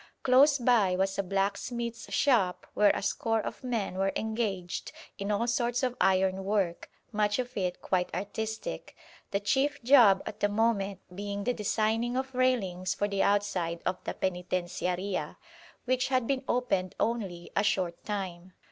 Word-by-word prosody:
Close 275 +3 +6
by 235 -7 +3
was 195 +1 0
a - - +5
blacksmith's 200 +5 -2
shop 220 -10 +2
where 210 -1 +5
a - - -3
score 225 +2 0
of 215 - -5
men 220 -7 -2
were 195 0 +2
engaged 215 -5 -2 0.3
in 200 +1 -3
all 210 +3 +1
sorts 240 +1 0
of 250 -1 0
iron 190 0 +3
work, 195 -4 -1 0.2
much 210 -1 +1
of 250 -1 -4
it 180 -3 -2
quite 180 -1 0
artistic, 220 - -4 0.3
the 200 - 0
chief 270 +8 +1
job 235 -7 +7
at - - -7
the 205 - +2
moment 205 -3 +1
being 200 +1 -4
the 245 - +1
designing 225 +3 0
of 265 0 -3
railings 195 -8 +1
for 205 - 0
the 200 -1 -1
outside 190 -5 +1
of 185 0 -2
the - - -3
Penitenciaria, 180 -1 -2 0.5
which 255 0 +1
had 255 -2 +1
been 270 +1 -1
opened 195 -7 0
only 195 -7 -2
a - - +4
short 190 -4 0
time. 185 -3 -5
205 Hz, 155 wpm, -29 LUFS, 190-235 Hz, 0.5 s, job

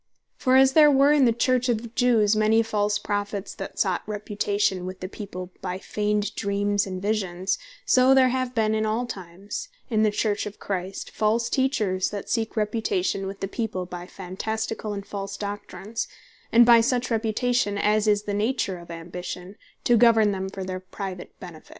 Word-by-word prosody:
For 260 0 +2
as 265 0 +6
there 300 0 +7
ware 280 0 +5
in 295 -3 +5
the 235 - +5
Church 250 +2 +1
of 230 -1 0
the 235 - -7
Jews, 225 -3 +3
many 215 +1 +4
false 210 -2 0
Prophets, 205 -1 -3
that - - -8
sought - - +1
reputation 205 -3 -1
with 185 0 -7
the 185 - -5
people, 185 -2 -7
by 180 -1 -3
feigned 210 +1 -1
Dreams, 200 0 0
and 185 -1 -4
Visions; 190 -3 -1 0.3
so 255 +1 +5
there 260 -1 +5
have 255 -1 -2
been 220 -1 +2
in 215 0 +1
all 220 +3 0
times 195 - -7 0.2
in 215 -1 +2
the 215 - +4
Church 210 0 -1
of 205 - -9
Christ, 190 -1 -4
false 230 +2 +1
Teachers, 215 -9 +1
that 205 -1 -6
seek 225 -1 -1
reputation 205 -3 0
with 195 +1 -7
the 195 - -1
people, 200 -3 -3
by 180 0 -8
phantasticall 215 +3 -4
and 200 0 -6
false 195 -1 -5
Doctrines; 205 +1 -5 0.4
and 235 +1 +7
by 235 -1 +7
such 250 +1 0
reputation 225 0 +1
(as 210 +1 +2
is 205 -1 +3
the 205 - -3
nature 205 -3 -1
of 170 - -13
Ambition,) 180 +3 -7 0.3
to 240 - +4
govern 225 -2 +5
them 190 -1 -3
for 195 0 -6
their 185 0 -4
private 185 -1 -8
benefit. 170 -4 -11
210 Hz, 180 wpm, -25 LUFS, 195-230 Hz, 0.4 s, there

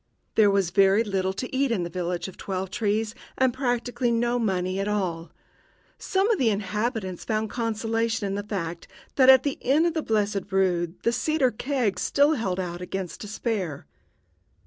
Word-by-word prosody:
There 215 -2 +5
was 195 -3 +1
very 195 +3 +4
little 190 -3 -1
to 250 +6 -5
eat 275 +1 +2
in 215 -7 0
the - - -2
village 175 0 -2
of 190 - -10
Twelve 190 -1 -4
trees, 215 +1 0 0.2
and 260 -2 +3
practically 245 -1 -1
no 240 +1 +1
money 185 -3 -1
at 195 - -1
all. 180 -5 -2 0.7
Some 385 +1 +1
of 430 - +1
the 245 - +3
inhabitants 210 -2 -2
found 215 -1 -1
consolation 225 -1 -1
in 195 - -2
the 200 - -2
fact 175 -5 -5 0.3
that 260 -1 +6
at 260 -1 +8
the 285 - -2
Inn 290 +6 +3
of 340 - +1
the 320 - -1
Blessed 205 -4 -1
Rood 180 -3 +1
the 235 - +3
cider 310 -2 +1
kegs 235 -6 -1
still 285 +2 +3
held 195 -9 -2
out 175 -1 -4
against 185 0 -5
despair. 210 - -3
210 Hz, 175 wpm, -25 LUFS, 190-240 Hz, 0.7 s, at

